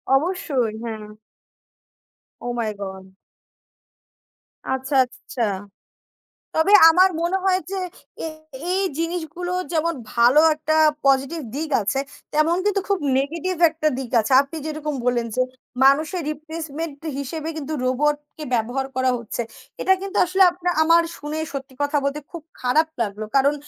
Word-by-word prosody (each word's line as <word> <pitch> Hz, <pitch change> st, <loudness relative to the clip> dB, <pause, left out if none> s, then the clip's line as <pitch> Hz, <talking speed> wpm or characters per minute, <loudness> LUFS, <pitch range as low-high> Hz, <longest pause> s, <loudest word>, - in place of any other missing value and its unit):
অবশ্যই। 275 Hz, -, 0 dB
হ্যাঁ। 220 Hz, -2 st, -5 dB, 1.3 s
ওহ 245 Hz, -, -3 dB
মাই 220 Hz, -2 st, -1 dB
গড! 190 Hz, -1 st, -7 dB, 1.6 s
আচ্ছা, 265 Hz, +2 st, -2 dB
আচ্ছা। 245 Hz, 0 st, -8 dB, 1.1 s
তবে 320 Hz, +6 st, +3 dB, 0.2 s
আমার 365 Hz, +3 st, +6 dB
মনে 345 Hz, +3 st, +1 dB
হয় 375 Hz, -1 st, +3 dB
যে 390 Hz, -, -3 dB, 0.5 s
এ -, -, -1 dB, 0.4 s
এই 385 Hz, +2 st, +1 dB, 0.2 s
জিনিসগুলো 345 Hz, +1 st, -3 dB, 0.2 s
যেমন 335 Hz, 0 st, +1 dB, 0.2 s
ভালো 245 Hz, +5 st, +6 dB
একটা 310 Hz, +1 st, -1 dB, 0.3 s
পজিটিভ 275 Hz, +4 st, +2 dB
দিক 310 Hz, +1 st, -3 dB
আছে, 205 Hz, +7 st, -1 dB, 0.3 s
তেমন 310 Hz, +3 st, +3 dB
কিন্তু 410 Hz, -1 st, +2 dB
খুব 400 Hz, -2 st, +2 dB, 0.2 s
নেগেটিভ 335 Hz, +6 st, -2 dB
একটা 310 Hz, -1 st, 0 dB
দিক 255 Hz, -3 st, -5 dB
আছে। 220 Hz, +5 st, -2 dB
আপনি 285 Hz, +4 st, -9 dB
যেরকম 305 Hz, -1 st, -3 dB
বললেন 240 Hz, -2 st, +1 dB
যে 255 Hz, -, +2 dB, 0.4 s
মানুষের 310 Hz, +6 st, +3 dB
রিপ্লেসমেন্ট 310 Hz, 0 st, -6 dB, 0.2 s
হিসাবে 305 Hz, +3 st, -4 dB
কিন্তু 305 Hz, 0 st, -5 dB
রোবটকে 295 Hz, +3 st, -1 dB
ব্যবহার 245 Hz, +4 st, 0 dB
করা 260 Hz, 0 st, +2 dB
হচ্ছে। 235 Hz, +1 st, -4 dB, 0.4 s
এটা 380 Hz, -, +4 dB
কিন্তু 395 Hz, +1 st, -5 dB
আসলে 375 Hz, +2 st, +3 dB
আপনা 355 Hz, 0 st, -4 dB
আমার 335 Hz, +1 st, +5 dB, 0.2 s
শুনে, 295 Hz, +2 st, -4 dB
সত্যি 270 Hz, -1 st, -6 dB
কথা 285 Hz, +1 st, 0 dB
বলতে, 280 Hz, +2 st, -1 dB
খুব 340 Hz, -, -7 dB, 0.2 s
খারাপ 305 Hz, +6 st, +2 dB
লাগলো। 210 Hz, 0 st, -4 dB
কারণ 280 Hz, +2 st, +4 dB
300 Hz, 135 wpm, -22 LUFS, 260-335 Hz, 1.6 s, আমার